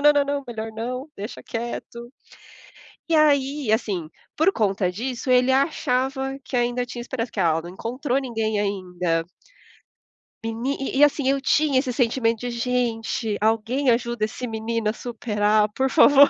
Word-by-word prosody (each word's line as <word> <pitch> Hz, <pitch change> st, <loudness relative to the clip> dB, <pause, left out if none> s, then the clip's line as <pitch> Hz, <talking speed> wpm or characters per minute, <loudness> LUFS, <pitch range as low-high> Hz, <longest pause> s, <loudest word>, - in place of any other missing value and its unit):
não, 295 Hz, +1 st, +7 dB
não, 285 Hz, +1 st, -1 dB
não, 280 Hz, -, -10 dB
melhor 225 Hz, -1 st, -4 dB
não 250 Hz, +5 st, -4 dB
deixa 205 Hz, +4 st, -7 dB
quieto. 235 Hz, 0 st, -6 dB, 1.0 s
E 330 Hz, -, +2 dB
aí, 285 Hz, -4 st, +3 dB
assim, 200 Hz, -8 st, 0 dB, 0.3 s
por 320 Hz, +6 st, +4 dB
conta 195 Hz, -, +1 dB
disso, 250 Hz, +6 st, -3 dB
ele 250 Hz, +1 st, +5 dB
achava 270 Hz, -1 st, +1 dB
que 255 Hz, -, -3 dB
ainda 245 Hz, +1 st, 0 dB
tinha 245 Hz, 0 st, -7 dB
esperança, 240 Hz, -1 st, -4 dB
que 205 Hz, -, -2 dB
"Ah, 170 Hz, -, +4 dB
ela 160 Hz, 0 st, +1 dB
não 175 Hz, -, -8 dB
encontrou 250 Hz, +7 st, -2 dB
ninguém 225 Hz, -5 st, -1 dB
ainda". 180 Hz, -4 st, -1 dB, 1.2 s
Meni 230 Hz, +5 st, -2 dB
e 270 Hz, 0 st, -3 dB
e -, -, +7 dB
assim 290 Hz, -2 st, +3 dB
eu 275 Hz, 0 st, +1 dB
tinha 285 Hz, -1 st, +3 dB
esse 260 Hz, -1 st, -1 dB
sentimento 230 Hz, -2 st, +1 dB
de 245 Hz, 0 st, -3 dB
gente, 235 Hz, -3 st, -1 dB
alguém 225 Hz, +5 st, +1 dB
ajuda 235 Hz, -2 st, +1 dB
esse 250 Hz, +3 st, -5 dB
menino 225 Hz, 0 st, -2 dB
a 215 Hz, -, -1 dB
superar 215 Hz, -3 st, +1 dB
por 265 Hz, +3 st, +1 dB
favor. 285 Hz, -1 st, +7 dB
240 Hz, 160 wpm, -24 LUFS, 220-265 Hz, 1.2 s, não